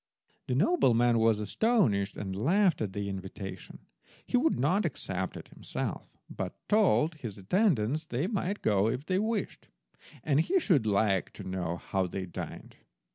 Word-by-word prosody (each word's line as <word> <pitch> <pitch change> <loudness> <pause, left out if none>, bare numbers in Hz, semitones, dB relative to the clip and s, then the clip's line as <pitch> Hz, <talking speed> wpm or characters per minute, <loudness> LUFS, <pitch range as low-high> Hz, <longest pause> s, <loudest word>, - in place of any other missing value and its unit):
The 125 - 0
nobleman 120 - +3
was 110 -1 +3
astonished, 105 - +1
and 95 -2 -4
laughed 175 - +2
at 100 -3 -2
the 100 0 -3
invitation. 95 0 -7 0.4
He - - -2
would 295 +6 +2
not 180 - +2
accept - - -3
it - - -11
himself, - - -5
but - - -5
told 195 -6 +3
his 120 -10 -8
attendants 150 - +1
they 125 +7 -1
might 200 -1 -2
go 105 0 +3
if 125 +5 -2
they 185 +2 +1
wished, 220 -1 -2 0.6
and 145 -1 +2
he 375 - +2
should 155 - +2
like 100 -2 +1
to - - -9
know 90 -2 -3
how 95 +1 -1
they 95 +1 -4
dined. 85 - -8
120 Hz, 155 wpm, -30 LUFS, -, 0.6 s, nobleman